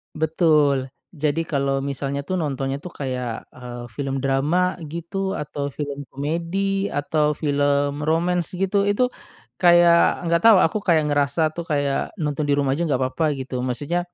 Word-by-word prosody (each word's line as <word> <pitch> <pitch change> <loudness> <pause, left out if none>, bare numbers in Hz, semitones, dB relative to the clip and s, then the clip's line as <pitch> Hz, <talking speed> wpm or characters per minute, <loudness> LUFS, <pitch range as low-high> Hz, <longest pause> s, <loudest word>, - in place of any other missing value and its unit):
Betul, 150 -4 +2 0.2
jadi 155 0 -1
kalau 140 -3 -1
misalnya 140 0 -3
tuh 185 -1 0
nontonnya 135 -3 -2
tuh 180 - -7
kayak, 125 -3 -3 0.2
eee, 120 -1 -8
film 140 -2 -2
drama, 135 +5 +1 0.3
gitu, 190 +4 -3
atau 145 -1 -4
film 145 -1 -5
komedi, 170 +7 -1
atau 150 +1 +1
film 145 -1 +1
romance, 170 +1 +1
gitu, 195 +1 0
itu 205 +5 +1 0.6
kayak 175 -1 +6 0.3
nggak 170 - +4
tahu 225 -2 +9
aku, 215 - -2
kayak 165 -4 +4
ngerasa 145 +2 +1
tuh, 170 - -5
kayak 145 -2 0
nonton 150 0 -1
di 145 - +2
rumah 140 -1 +1
aja 170 - 0
nggakpapa 130 +2 0 0.2
gitu, 130 0 -6
maksudnya 145 +8 -1
145 Hz, 150 wpm, -22 LUFS, 140-170 Hz, 0.6 s, tahu